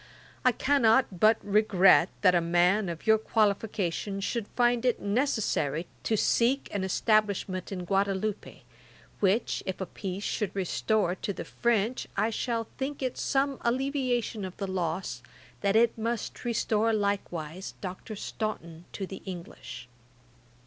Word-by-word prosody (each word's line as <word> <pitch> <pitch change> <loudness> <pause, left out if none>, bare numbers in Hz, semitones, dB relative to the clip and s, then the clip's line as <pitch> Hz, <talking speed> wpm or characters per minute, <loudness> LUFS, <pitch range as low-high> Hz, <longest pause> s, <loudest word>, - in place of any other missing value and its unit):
I 255 - +5
cannot 240 -7 +3
but 220 +3 +6
regret 195 -3 +5
that 185 -3 +5
a 175 - +3
man 175 +4 +2
of 170 -1 -6
your 220 0 +5
qualifications 200 -3 0
should 230 0 -2
find 240 -1 +3
it 250 -2 +2
necessary 200 - 0 0.2
to 220 - +1
seek 245 +6 +2
an 200 -2 -1
establishment 200 -2 +1
in 180 -2 -4
Guadaloupe, 195 +2 -1 0.6
which 205 +4 +1
if 190 - -3
a 190 - -2
peace 190 +2 -6
should 210 -2 -2
restore 195 0 +1
to 200 +2 -4
the - - -6
French, 235 0 0
I 215 +3 +2
shall 230 0 -1 0.2
think 275 +1 -3
it 255 - -1
some 275 0 0
alleviation 250 -3 0
of 185 -1 -6
the 200 - -3
loss, 175 -8 -3 0.4
that 200 +1 +1
it 230 +1 +4
must 230 0 -3
restore 225 -1 +1
likewise 190 -4 -2
Dr. 190 +3 -6
Staunton 175 -6 -5
to 195 - -4
the 190 0 -9
English. 170 -9 -8
205 Hz, 140 wpm, -28 LUFS, 185-230 Hz, 0.6 s, but